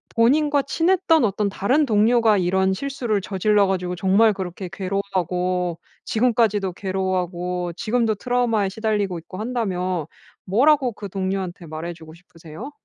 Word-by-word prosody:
본인과 285 +5 +3
친했던 335 -2 +2
어떤 205 0 0
다른 255 +10 +1
동료가 220 -1 +3
이런 190 +1 +1
실수를 240 -3 -2
저질러 200 +1 +2
가지고 180 -1 -2
정말 195 +4 +3
그렇게 185 -1 -6
괴로워하고 185 -2 -2 0.3
지금까지도 220 -5 +1
괴로워하고 180 -2 -2
지금도 225 -1 0
트라우마에 235 -3 0
시달리고 205 -3 -1
있고 185 +3 -11
한다면 185 - -2 0.4
뭐라고 260 +5 +3
그 205 - -7
동료한테 185 -2 -3
말해 160 +3 -5
주고 160 -1 -13
싶으세요? 170 - -11
195 Hz, 360 characters per minute, -22 LUFS, 180-230 Hz, 0.4 s, 본인과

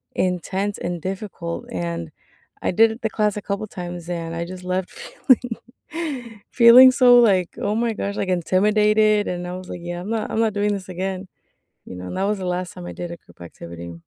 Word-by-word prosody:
intense 190 +3 -1
and 175 -1 -4
difficult, 185 -2 -5
and 85 -2 -4 0.5
I - - 0
did 225 +4 +3
the 220 - -1
class 210 -1 0
a 210 - -4
couple 200 +2 -3
times, 175 -4 -7
and 165 -1 -4
I 170 - -3
just 185 +1 -9
left 180 0 -2
feeling 245 -3 0 0.9
feeling 250 +2 +9
so, 250 -2 +6
like, 190 -7 +3
oh 205 - -1
my 230 0 0
gosh, 200 -1 -4
like, 195 - -2
intimidated, 210 +4 +3
and 180 0 -4
I 180 - -5
was 185 0 -9
like, 175 - -6
"Yeah, 175 0 -5
I'm 195 - -7
not 225 -1 -2
I'm - - -1
not 225 -2 +2
doing 205 0 0
this 190 -2 -6
again." 185 +1 -4 0.6
You - - -9
know, 90 0 -7
and 185 - -5
that 190 - 0
was 205 0 -1
the 185 - -4
last 180 0 -3
time 180 -1 -9
I - - -6
did 175 -1 -6
a 170 - -7
group - - -23
activity. 85 0 -9
185 Hz, 210 wpm, -22 LUFS, 175-215 Hz, 0.9 s, feeling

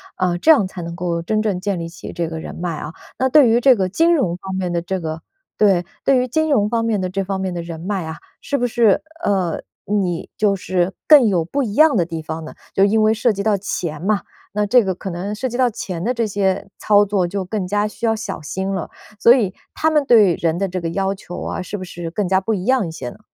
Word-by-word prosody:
啊， 180 -2 0
这 310 - 0
样 260 -11 +5
才 185 -1 -7
能 170 0 -6
够 170 -1 -2
真 215 +5 0
正 205 -4 -1
建 195 0 -2
立 165 0 -5
起 170 - -9
这 170 -1 -2
个 160 -1 -5
人 - - -7
脉 170 -2 -3
啊。 150 +2 -6 0.2
那 260 - +2
对 265 -2 +6
于 235 +2 +4
这 260 0 +6
个 190 -4 -1
金 330 - +3
融 180 - 0
方 190 0 -6
面 180 -2 -2
的 170 -1 0
这 185 +1 -3
个 160 0 -4 0.4
对， 190 -5 +3 0.2
对 270 -1 +4
于 250 - 0
金 315 +5 0
融 210 -7 +2
方 230 -1 0
面 215 -4 0
的 185 - -2
这 195 +2 -2
方 190 0 -3
面 190 -1 -2
的 175 - -3
人 165 -1 -7
脉 190 -2 -2
啊， 160 - -5 0.2
是 285 - -2
不 245 - 0
是 235 -4 +3 0.2
呃， 185 -5 0 0.2
你 190 -4 -1
就 205 -2 +2
是 185 -1 -1
更 290 -6 +8
有 180 -5 +2
不 275 - -2
一 210 -5 -3
样 305 -3 +5
的 170 - +2
地 165 -1 -5
方 160 0 -6
呢？ - - -9 0.2
就 195 - +4
因 220 +2 +2
为 215 0 +4
涉 225 0 +1
及 200 0 -3
到 210 -2 +2
钱 170 -5 -4
嘛。 200 +2 +1 0.3
那 210 0 +1
这 240 +3 +5
个 190 -2 -2
可 190 0 -6
能 195 +5 -4
涉 260 +4 -2
及 245 0 -4
到 250 -2 +3
钱 180 -5 -5
的 240 - +1
这 235 -2 0
些 195 -2 -1
操 205 -1 +4
作 195 -3 0
就 195 +1 -3
更 190 -1 -3
加 205 +2 +1
需 230 +2 -4
要 225 - +2
小 220 -6 -5
心 190 +5 -4
了， 185 -4 -3 0.3
所 235 - +6
以 205 -7 0 0.2
他 315 - +2
们 300 -2 +3
对 210 -7 +6
人 165 0 0
的 195 0 0
这 185 0 -4
个 165 - -2
要 195 +3 -1
求 185 -2 -8
啊， - - -3
是 205 - -5
不 185 - -7
是 175 -2 -6
更 195 +3 -2
加 190 +1 +2
不 225 - -2
一 185 - -4
样 255 -5 +2
一 - - -6
些 125 -6 -6
呢？ - - -14
195 Hz, 290 characters per minute, -20 LUFS, 175-220 Hz, 0.4 s, 更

